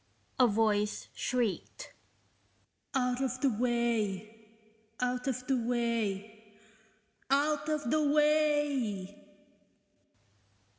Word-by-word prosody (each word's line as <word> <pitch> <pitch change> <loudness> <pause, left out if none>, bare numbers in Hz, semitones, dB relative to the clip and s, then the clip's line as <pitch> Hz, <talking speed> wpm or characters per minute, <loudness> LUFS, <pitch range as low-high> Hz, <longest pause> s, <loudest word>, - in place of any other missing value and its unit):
a 250 - +7
voice 210 -1 +1
shrieked 245 - -2 1.0
"out 250 -1 +1
of 255 -1 -1
the 275 - +4
way, 225 -2 -1 0.5
out 250 +1 -1
of 250 -1 -2
the 270 - +1
way, 220 -3 -2 0.7
OUT 295 +2 +1
OF 305 -1 0
THE 310 - +3
WAY!" 295 -10 +1
245 Hz, 85 wpm, -31 LUFS, 215-275 Hz, 1.0 s, a